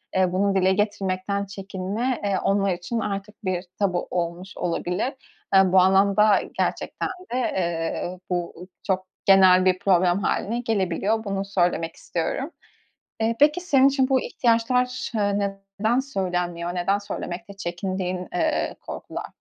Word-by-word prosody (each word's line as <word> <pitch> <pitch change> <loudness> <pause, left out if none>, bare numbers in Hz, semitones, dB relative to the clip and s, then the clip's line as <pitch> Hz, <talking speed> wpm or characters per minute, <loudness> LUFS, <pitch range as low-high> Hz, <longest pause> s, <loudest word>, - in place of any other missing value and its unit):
eee, 185 -1 +3
bunu 195 +1 +1
dile 190 0 +4
getirmekten 200 -1 -1
çekinme, 200 +5 -3
eee, 200 -2 +1
onlar 195 -1 +2
için 175 +7 -3
artık 205 +1 -5
bir 180 -1 -1 0.2
tabu 185 -3 0
olmuş 175 +2 -3
olabilir. 180 +7 -1 0.4
Eee, 190 -1 +6
bu 185 - +6
anlamda 200 +2 +5 0.2
gerçekten - - -1 0.2
de, - - 0
eee, 175 -4 -2
bu 175 0 -3 0.2
çok 190 -1 0 0.2
genel 190 -1 +6
bir 185 0 +3
problem 180 -1 +3
hâline 235 +4 0
gelebiliyor. 215 -1 0
Bunu 195 -1 -2
söylemek 175 -4 0
istiyorum. 265 - -3 0.7
Eee, 225 +1 +1
peki, 300 +4 +5
senin 275 -7 +4
için 265 -2 +1
bu 265 -2 +3
ihtiyaçlar, 250 +2 +1
eee, 200 -2 0 0.3
neden 225 +4 +2
söylenmiyor? 180 -8 -2
Neden 195 +3 +1
söylemekte 185 -2 -6
çekindiğin, 185 0 -3
eee, 315 -2 0
korkular? - - -6
195 Hz, 135 wpm, -24 LUFS, 180-215 Hz, 0.7 s, Eee